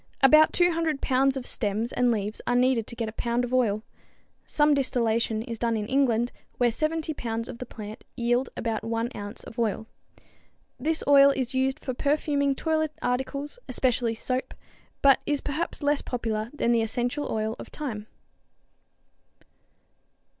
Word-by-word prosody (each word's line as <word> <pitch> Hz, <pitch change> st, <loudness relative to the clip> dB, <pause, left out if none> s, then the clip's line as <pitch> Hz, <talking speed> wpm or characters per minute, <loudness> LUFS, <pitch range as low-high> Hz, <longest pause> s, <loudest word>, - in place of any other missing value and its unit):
About 305 Hz, +3 st, +7 dB
200 330 Hz, -4 st, +2 dB
pounds 270 Hz, 0 st, +2 dB
of 255 Hz, -, -5 dB
stems 220 Hz, +1 st, -1 dB
and 245 Hz, 0 st, +2 dB
leaves 210 Hz, -1 st, -2 dB
are 245 Hz, -, +2 dB
needed 245 Hz, -3 st, +2 dB
to 235 Hz, -, -5 dB
get 230 Hz, -1 st, -2 dB
a -, -, -4 dB
pound 235 Hz, +2 st, -1 dB
of 245 Hz, +1 st, -4 dB
oil. 220 Hz, -4 st, +2 dB, 0.6 s
Some 295 Hz, 0 st, +3 dB
distillation 230 Hz, -5 st, +1 dB
is 230 Hz, -2 st, -6 dB
done 230 Hz, -1 st, +1 dB
in 210 Hz, -, -2 dB
England, 245 Hz, -2 st, +2 dB, 0.3 s
where 240 Hz, -1 st, +3 dB
70 315 Hz, +4 st, -1 dB
pounds 230 Hz, -3 st, -3 dB
of 245 Hz, -2 st, -8 dB
the 250 Hz, -, -6 dB
plant 215 Hz, -1 st, -9 dB
yield 240 Hz, +1 st, +1 dB
about 225 Hz, -2 st, -2 dB
one 230 Hz, +1 st, -2 dB
ounce 205 Hz, +3 st, -7 dB
of 230 Hz, -, -9 dB
oil. 220 Hz, -1 st, 0 dB, 0.9 s
This 315 Hz, +5 st, -1 dB
oil 280 Hz, -1 st, +8 dB
is 265 Hz, -2 st, -1 dB
used 265 Hz, 0 st, +1 dB
for 255 Hz, -, -1 dB
perfuming 280 Hz, 0 st, +1 dB
toilet 315 Hz, 0 st, 0 dB
articles, 275 Hz, -, -2 dB
especially 245 Hz, -2 st, +1 dB
soap, 255 Hz, +3 st, -2 dB, 0.5 s
but 275 Hz, -1 st, +7 dB
is 290 Hz, -1 st, +1 dB
perhaps 300 Hz, +2 st, -3 dB
less 290 Hz, 0 st, +2 dB
popular 225 Hz, -3 st, -3 dB
than 265 Hz, -5 st, 0 dB
the 230 Hz, -1 st, +3 dB
essential 245 Hz, +6 st, -2 dB
oil 220 Hz, 0 st, -1 dB
of -, -, -8 dB
thyme. 220 Hz, -8 st, -5 dB
245 Hz, 160 wpm, -26 LUFS, 230-280 Hz, 0.9 s, oil